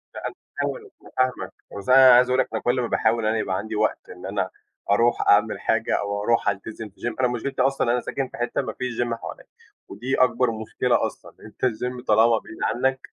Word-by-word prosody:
لا، - - -4
أنا - - -8 0.3
فاهمك، 435 -4 -4
أنا - - -16 0.2
فاهمك، - - -8 0.2
بس 100 +4 -7
أنا 130 0 +8
عايز 125 +1 +5
أقول 130 +1 +2
لك - - +2
أنا 110 - -2
كل 125 +1 +1
ما 120 - -1
باحاول 115 0 +1
أنا 110 +1 +1
يبقى 95 -3 -1
عندي 110 +2 -5
وقت 110 +1 -1
إن - - -10
أنا - - -2 0.4
أروح 115 +4 +3
أعمل - - +4
حاجة - - 0
أو 100 0 -3
أروح 115 +1 +2
ألتزم 105 +2 -5
في 95 - -26
gym، 120 -2 -3
أنا 125 - +3
مشكلتي 125 +2 -2
أصلًا 135 -2 +2
أنا 125 0 +1
ساكن 135 -2 -3
في - - -12
حتّة 120 0 -1
ما - - -5
فيش 125 -2 -3
gym 120 -1 -1
حواليّا 115 - -8 0.4
ودي 125 +7 -3
أكبر 125 -1 +2
مشكلة 115 +3 0
أصلًا، - - -8
أنت 110 +4 -5
الgym 125 +1 -3
طالما 110 +2 +5
بعيد 110 - -12
عنّك 130 +2 +1
120 Hz, 220 wpm, -24 LUFS, 110-125 Hz, 0.4 s, أنا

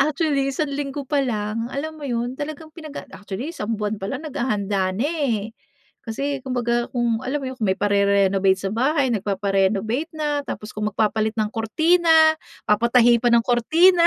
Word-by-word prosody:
Actually 280 -1 +1
isang 285 +2 -2
linggo 280 0 -3
pa 290 +2 0
lang, 225 -3 -2
alam 310 +4 -5
mo 295 - -8
yun 245 0 -2
talagang 310 +1 -6
pinag 310 -2 -10
ac - - -8
actually, 205 - -6
isang 230 -9 -3
buwan 210 -1 -3
pa 195 - -5
lang 265 +7 -4
naghahanda 205 -9 -1
na, 210 - -1
eh. 270 -10 -1 0.5
Kasi 275 +5 -3
kumbaga 240 -2 -1
kung 235 -2 +1
alam 275 +4 -3
mo - - -4
yun, 260 - -10
kung 220 - 0
may 190 - +2
parerenovate 200 -1 +3
sa 195 0 -4
bahay, 265 +4 +1
nagpapa-renovate 200 - 0
na, 295 -2 0
tapos 210 - -6
kung 210 0 -2
magpapalit 215 +1 0
ng 215 -1 0
kurtina, 325 +10 +2 0.6
papatahi 235 +2 +4
pa 245 - +2
ng 230 -1 +4
kurtina. 335 +9 +4
240 Hz, 175 wpm, -22 LUFS, 210-285 Hz, 0.6 s, papatahi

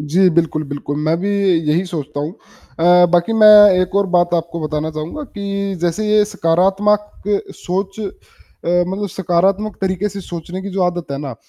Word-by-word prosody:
जी। 175 +6 +2
बिल्कुल, 160 -2 +1
बिल्कुल। 145 0 -5
मैं 160 +1 +1
भी 200 - -2 0.4
यही 170 +5 +1
सोचता 150 -4 -5
हूँ 155 +4 -4 0.5
अ, 175 +1 +6
बाकी 175 +5 +2
मैं 215 -1 +6 0.3
एक 185 +1 -2
और 200 -1 +2
बात 175 0 +3
आपको 170 0 -3
बताना 155 0 -3
चाहूँगा 155 - -6
कि 200 -1 -3
जैसे 175 +5 -1
ये 210 0 +4
सकारात्मक 200 +2 0 0.3
सोच 195 +3 -4
अ, 210 - -3 0.8
मतलब 200 +2 -3
सकारात्मक 190 +4 0
तरीके 190 +1 -1
से 200 0 -7
सोचने 175 +1 -7
की 200 - -6
जो 190 0 -1
आदत 175 -1 -1
है 140 - -4
ना, 135 -4 -6
180 Hz, 170 wpm, -17 LUFS, 165-200 Hz, 0.8 s, अ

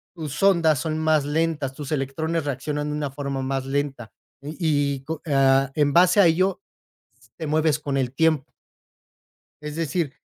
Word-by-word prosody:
tus 150 -2 -6
ondas 170 -6 +4
son 155 -1 -2
más 155 -2 +2
lentas, 150 -2 -1
tus 145 +1 -8
electrones 155 +4 -2
reaccionan 145 +2 -3
de 150 - -3
una 145 -3 -3
forma 140 -1 -4
más 135 0 -2
lenta 135 -5 -3 0.3
y 150 +3 -8
y, 145 -5 0
con 160 +1 -5
ah, 135 -1 +3
en 145 -2 +2
base 180 +4 +5
a 200 - +7
ello, 185 - +1 0.8
te 160 -2 -5
mueves 155 -1 +1
con 140 -2 -2
el 130 -2 -1
tiempo. 155 -1 +1 1.1
Es 150 0 -6
decir, 165 -2 -2
150 Hz, 165 wpm, -23 LUFS, 135-160 Hz, 1.1 s, a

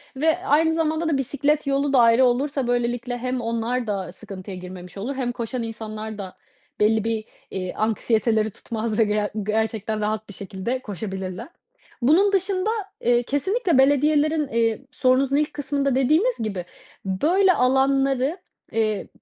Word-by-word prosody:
ve 315 +5 +2
aynı 320 +3 +3
zamanda 320 0 0
da 285 - +2
bisiklet 285 +2 0
yolu 275 0 +1
da 260 - +6
ayrı 235 +2 +6
olursa, 265 +1 0
böylelikle 245 0 -1
hem 255 +1 -2
onlar 230 +1 -1
da 195 -3 -3
sıkıntıya 190 -1 -8
girmemiş 180 0 -9
olur 250 +8 -3
hem 250 -2 -1
koşan 240 +1 -4
insanlar 220 -1 -6
da 190 -2 -8 0.4
belli 215 0 +3
bir, 225 -1 -2 0.3
eee, 185 -1 -4
anksiyeteleri 220 0 +1
tutmaz 220 0 -4
ve 225 - +7
ger 210 0 0
gerçekten 220 0 -1
rahat 215 0 -2
bir - - -8
şekilde 195 +6 -4
koşabilirler. 190 - -6 0.5
Bunun 355 +11 +4
dışında, 380 +1 +1 0.3
eee, 240 0 +3
kesinlikle 365 - +1
belediyelerin, 295 +3 +3
eee, 230 +1 0
sorunuzun 265 0 +2
ilk 300 +1 +1
kısmında 280 -2 -1
dediğiniz 315 - +3
gibi 195 -5 -3 0.4
böyle 345 - +3
alanları, 270 +3 +2 0.3
eee, 215 -2 0
245 Hz, 145 wpm, -23 LUFS, 215-285 Hz, 0.5 s, ve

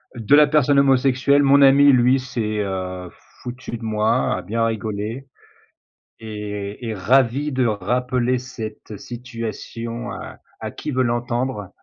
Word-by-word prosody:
De 120 +5 +3
la 150 0 +7
personne 145 -2 +3
homosexuelle, 135 +1 +3
mon 140 +1 +5
ami 140 +1 +7
lui 125 +1 +4
s'est, 110 -4 -3
heu, 95 -2 -5 0.3
foutu 125 -1 -6
de 115 - -12
moi, 110 0 +1
a - - -5
bien 115 +4 -1
rigolé 110 +3 -4 0.9
et 105 0 -6
est 110 - -3
ravi 130 +8 +2
de 130 -2 +1
rappeler 125 +4 0
cette 110 -4 -8
situation 115 0 -6
à - - -9 0.2
à - - -5
qui - - -6
veut 130 -1 +1
l'entendre. 120 -3 -2
120 Hz, 135 wpm, -21 LUFS, 110-130 Hz, 0.9 s, la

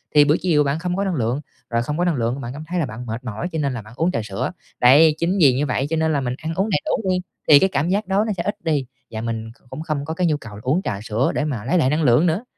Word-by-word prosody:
thì 145 -1 +7
bữa 150 +1 +4
chiều 160 -5 +3
bạn 140 +2 -1
không 180 +1 -2
có 195 - 0
năng 190 -3 -1
lượng, 125 +1 -1 0.3
rồi 115 0 0
không 150 +5 -3
có 175 - +1
năng 175 -3 +1
lượng 120 +2 -1
bạn 120 -1 -5
cảm 150 +2 -7
thấy 180 +1 -2
là 160 - +1
bạn 120 0 -7
mệt 115 +2 -5
mỏi 115 +6 -4
cho 160 - -2
nên 140 -3 0
là 120 - -5
bạn 110 +2 -14
uống 165 +3 +1
trà - - -1
sữa. 100 -2 -3 0.3
Đấy, 150 +5 +7
chính 175 +4 +1
vì 140 -7 +6
như 135 +4 0
vậy 135 0 -1
cho 165 - 0
nên 160 0 +1
là 140 - +1
mình 125 -1 -2
ăn 160 +2 -4
uống 195 +5 0
đầy 170 - +2
đủ 195 - -1
đi, 180 - +1 0.3
thì 145 -2 +9
cái 190 - +3
cảm 155 -1 0
giác 200 +2 0
đói 195 +3 +2
nó 220 - -1
sẽ 170 - -1
ít 205 - -2
đi, 150 -5 0 0.3
và 110 -1 -4
mình 115 -1 -4
kh - - -31
cũng 155 - -6
không 155 -3 -3
có 160 - -3
cái 175 +2 +1
nhu 155 -2 +1
cầu 115 -7 -10
uống 145 +8 +1
trà 100 - -3
sữa 110 +4 0
để 150 - 0
mà 125 -8 -3
lấy 175 +8 +2
lại 130 -6 +3
năng 155 +3 +1
lượng 125 +4 +4
nữa. 170 +7 0
150 Hz, 330 wpm, -21 LUFS, 125-170 Hz, 0.3 s, thì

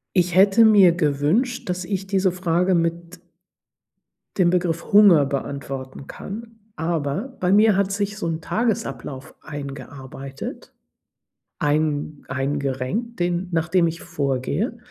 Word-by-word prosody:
Ich 180 -1 +2
hätte 195 +4 +6
mir 200 -5 +7
gewünscht, 180 - 0
dass 180 0 -2
ich 195 +1 -3
diese 190 -1 +2
Frage 180 +1 +1
mit 170 +1 -1 1.2
dem 175 -2 +4
Begriff 170 0 -1
Hunger 195 -8 +7
beantworten 135 -1 -5
kann. 225 +2 -9 0.2
Aber 165 - -2
bei 180 0 +1
mir 210 0 +5
hat 195 0 +1
sich 205 +1 -2
so 170 - -3
'n 165 0 -3
Tagesablauf 155 - -3
eingearbeitet, 140 -1 -8 0.9
ein 150 0 -1
eingerenkt, 140 - -2
den 175 +1 -1
nachdem 170 +2 +2
ich 165 +1 -3
vorgehe. 145 - -2
170 Hz, 115 wpm, -22 LUFS, 145-195 Hz, 1.2 s, mir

